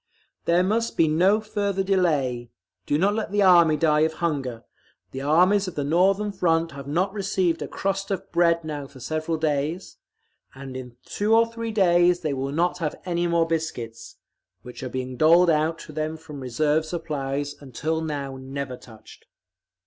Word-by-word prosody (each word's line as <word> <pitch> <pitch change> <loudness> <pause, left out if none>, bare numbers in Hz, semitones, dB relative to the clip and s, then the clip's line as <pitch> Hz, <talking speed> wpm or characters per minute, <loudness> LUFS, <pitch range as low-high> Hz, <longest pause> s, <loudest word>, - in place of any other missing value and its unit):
"There 175 +2 +3
must 225 +4 -1
be 165 - +4
no 185 +7 +3
further 200 -3 -2
delay; 145 -11 0 0.4
do 145 - +2
not 195 +5 +2
let 215 -2 -3
the 205 0 +2
Army 170 -4 +6
die 150 -1 +3
of 160 +1 +2
hunger; 140 -9 -3 0.5
the 135 - -6
armies 180 +7 +3
of 185 - -6
the 145 - -1
Northern 190 +7 +2
Front 165 -3 +1
have 140 -1 -9
not 180 +7 0
received 190 -4 0
a - - -3
crust 195 0 -3
of 195 - -4
bread 170 -1 +3
now 145 -3 -5
for 135 -1 -15
several 155 +5 -2
days, 155 +3 -2 0.6
and 135 -1 -9
in 125 -2 -8
two 215 +2 +1
or 230 0 +5
three 230 0 -5
days 175 -3 +3
they 155 -4 -1
will 135 0 -3
not 175 +4 0
have 155 -3 -2
any 175 -1 0
more 170 -1 +2
biscuits—which 125 -5 -7
are 130 - -4
being 130 0 -5
doled 170 +4 +5
out 160 +1 +1
to - - -11
them 155 +1 -3
from 155 -3 -10
reserve 150 +5 0
supplies 145 -4 -3
until 155 +4 -3
now 140 -4 -4
never 130 0 -6
touched…. 110 -3 -16
160 Hz, 170 wpm, -24 LUFS, 140-180 Hz, 0.6 s, Army